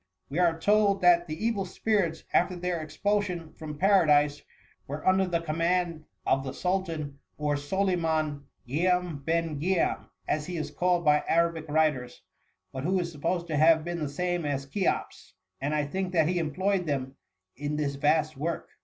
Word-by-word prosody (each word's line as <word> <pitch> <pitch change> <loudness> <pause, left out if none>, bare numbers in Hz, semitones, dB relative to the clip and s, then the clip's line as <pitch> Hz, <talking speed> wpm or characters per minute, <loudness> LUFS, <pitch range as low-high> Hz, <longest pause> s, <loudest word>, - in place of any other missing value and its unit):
" - - -48
We 155 - -1
are 170 -2 +3
told 205 +1 +3
that 175 -1 +5
the 160 +7 -4
evil 225 -4 +1
spirits, 185 -3 -1
after 180 +1 +3
their 175 -1 -2
expulsion 180 +1 -2
from 150 -2 -8
Paradise, 150 -6 +4 0.5
were 145 +5 -5
under 190 0 +4
the 170 -2 0
commaad 165 0 0 0.2
of 135 - +2
the 135 -1 -5
Sul 185 +1 +1
tan,, 155 -6 -6 0.2
or 150 -1 0
Soliman 160 -2 0 0.2
Gimn 180 +3 +1
ben 165 -2 -1
Giam, 180 +1 0 0.2
as 150 0 -1
he 180 -1 -4
is 155 - -4
called 175 -1 +1
by 150 0 +4
Arabic 165 -1 +1
writers, 145 -5 0 0.5
but 130 - -5
who 185 +4 +1
is 170 -1 -3
supposed 170 +3 -2
to 160 -3 -2
have 160 +1 +5
been 175 0 -3
the 150 -3 -2
same 175 +3 -1
as 140 -2 -2
Cheops; 185 +7 -2 0.3
and 145 +3 -1
I 150 -1 +1
think 185 +5 -3
that 160 -3 +3
he 175 +1 +1
employed 180 +4 0
them 135 -2 -2 0.4
in 145 +2 -3
this 145 -2 -1
vast 155 +2 +1
work."" 165 +4 -3
165 Hz, 175 wpm, -28 LUFS, 150-180 Hz, 0.5 s, that